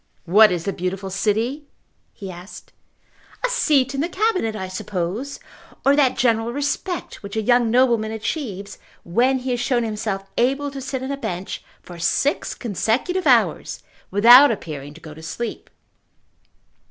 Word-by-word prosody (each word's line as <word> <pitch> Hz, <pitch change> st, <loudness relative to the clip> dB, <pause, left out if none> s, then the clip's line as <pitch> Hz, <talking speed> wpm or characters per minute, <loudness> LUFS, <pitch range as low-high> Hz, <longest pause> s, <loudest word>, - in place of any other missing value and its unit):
"What 210 Hz, +4 st, +6 dB
is 175 Hz, -2 st, -2 dB
the 195 Hz, -, -1 dB
beautiful 190 Hz, +2 st, -4 dB
city?" 225 Hz, +9 st, -1 dB, 0.4 s
he 195 Hz, -2 st, -8 dB
asked. 180 Hz, +2 st, -12 dB, 0.7 s
"A -, -, +1 dB
seat 285 Hz, -, +2 dB
in 275 Hz, -, -1 dB
the 335 Hz, -, -1 dB
Cabinet, 370 Hz, -, 0 dB
I 190 Hz, -3 st, -4 dB
suppose, 185 Hz, +7 st, -4 dB, 0.5 s
or 275 Hz, +1 st, +5 dB
that 275 Hz, -3 st, +3 dB
general 230 Hz, -1 st, +1 dB
respect 290 Hz, +6 st, -3 dB
which 200 Hz, +1 st, -8 dB
a 220 Hz, -, 0 dB
young 240 Hz, 0 st, +3 dB
nobleman 235 Hz, -3 st, +2 dB
achieves 215 Hz, -, -5 dB, 0.2 s
when 245 Hz, +9 st, +2 dB
he 255 Hz, 0 st, -4 dB
has 245 Hz, -, -1 dB
shown 240 Hz, 0 st, +1 dB
himself 210 Hz, -3 st, -3 dB
able 275 Hz, +4 st, +1 dB
to 275 Hz, -1 st, -7 dB
sit 265 Hz, 0 st, -4 dB
on 265 Hz, -, -3 dB
a 280 Hz, -, -3 dB
bench 185 Hz, -7 st, -5 dB, 0.2 s
for 175 Hz, -1 st, -11 dB
six 275 Hz, -, 0 dB
consecutive 245 Hz, -, -1 dB
hours -, -, +2 dB, 0.3 s
without 240 Hz, +8 st, +8 dB
appearing 150 Hz, -9 st, -5 dB
to 165 Hz, -, -14 dB
go 155 Hz, -2 st, -10 dB
to 160 Hz, -, -12 dB
sleep." 195 Hz, +9 st, -6 dB
230 Hz, 155 wpm, -22 LUFS, 195-270 Hz, 0.7 s, without